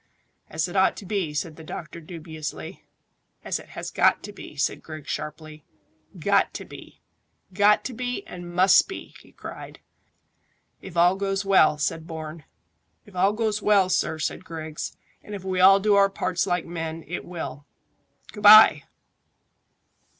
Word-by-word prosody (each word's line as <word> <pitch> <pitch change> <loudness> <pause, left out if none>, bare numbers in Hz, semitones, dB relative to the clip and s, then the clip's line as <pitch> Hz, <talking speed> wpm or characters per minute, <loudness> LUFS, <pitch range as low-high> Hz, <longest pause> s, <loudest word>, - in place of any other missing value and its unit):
"As 160 +2 -1
it 175 - -9
ought 190 0 +3
to 200 - -9
be," 190 -5 -2
said 150 +1 -4
the 160 - -11
doctor 160 +1 -8
dubiously. 160 +1 -8 0.6
"As - - -2
it - - -15
has - - -5
got - - +3
to 205 - -7
be," 150 - -11
said 140 - -1
Griggs 155 -2 -8
sharply. 155 0 -7 0.5
"Got - - +1
to - - -6
be - - -14 0.5
got 205 +2 +4
to 260 - -4
be, 245 +1 -4
and 175 -1 -9
must 185 +2 +5
be!" 385 - -9
he - - -20
cried. - - -10 1.0
"If 180 -3 -9
all 175 +2 +5
goes 195 0 -2
well," 190 -6 +4
said 160 +2 -2
Bourne. 160 -1 -8 0.6
"If 205 -3 -17
all 195 +3 +3
goes 215 -1 -1
well, 200 -3 +3
sir," 160 -3 0
said 160 - -3
Griggs, 160 -3 -7 0.2
"and 210 - -8
if 195 - -8
we 185 -1 -2
all 195 +2 +7
do 210 +1 +2
our 200 0 +5
parts 185 -1 -2
like 180 -2 0
men, 165 -1 -5
it 175 +5 -5
will. 160 -4 -7 0.6
Good 210 - -10
bye!" 210 -8 +8
175 Hz, 165 wpm, -25 LUFS, 160-195 Hz, 1.0 s, bye